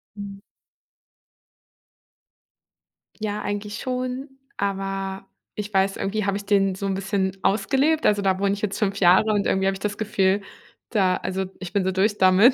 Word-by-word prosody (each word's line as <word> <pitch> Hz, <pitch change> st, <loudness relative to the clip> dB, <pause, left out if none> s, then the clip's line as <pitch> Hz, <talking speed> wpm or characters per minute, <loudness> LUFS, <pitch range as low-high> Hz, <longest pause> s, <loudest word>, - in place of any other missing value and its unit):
Mhm. 200 Hz, -1 st, -7 dB, 2.8 s
Ja, 210 Hz, -1 st, -2 dB
eigentlich 205 Hz, 0 st, -4 dB
schon, 255 Hz, +1 st, -3 dB, 0.3 s
aber 195 Hz, -1 st, -3 dB, 0.3 s
ich 210 Hz, 0 st, -5 dB
weiß 195 Hz, 0 st, +2 dB
irgendwie 210 Hz, +1 st, -1 dB
habe 200 Hz, 0 st, 0 dB
ich 205 Hz, -, -8 dB
den 195 Hz, -2 st, +2 dB
so 200 Hz, -, -5 dB
'n 195 Hz, -, 0 dB
bisschen 190 Hz, 0 st, -1 dB
ausgelebt, 275 Hz, +10 st, +2 dB
also, 205 Hz, -1 st, +4 dB
da 190 Hz, -1 st, +2 dB
wohne 200 Hz, 0 st, +2 dB
ich 205 Hz, -, -5 dB
jetzt 205 Hz, -2 st, -2 dB
5 200 Hz, -2 st, 0 dB
Jahre 190 Hz, +4 st, +5 dB
und 205 Hz, -1 st, +1 dB
irgendwie 190 Hz, 0 st, +1 dB
habe 195 Hz, -, +2 dB
ich 195 Hz, -, -7 dB
das 205 Hz, 0 st, -3 dB
Gefühl, 200 Hz, -2 st, +1 dB, 0.5 s
da 190 Hz, -5 st, +3 dB
also, 190 Hz, 0 st, -2 dB
ich 185 Hz, 0 st, -7 dB
bin 200 Hz, -, +2 dB
so 190 Hz, -, +1 dB
durch 200 Hz, +3 st, +1 dB
damit. 190 Hz, +7 st, +6 dB
200 Hz, 170 wpm, -24 LUFS, 190-210 Hz, 2.8 s, damit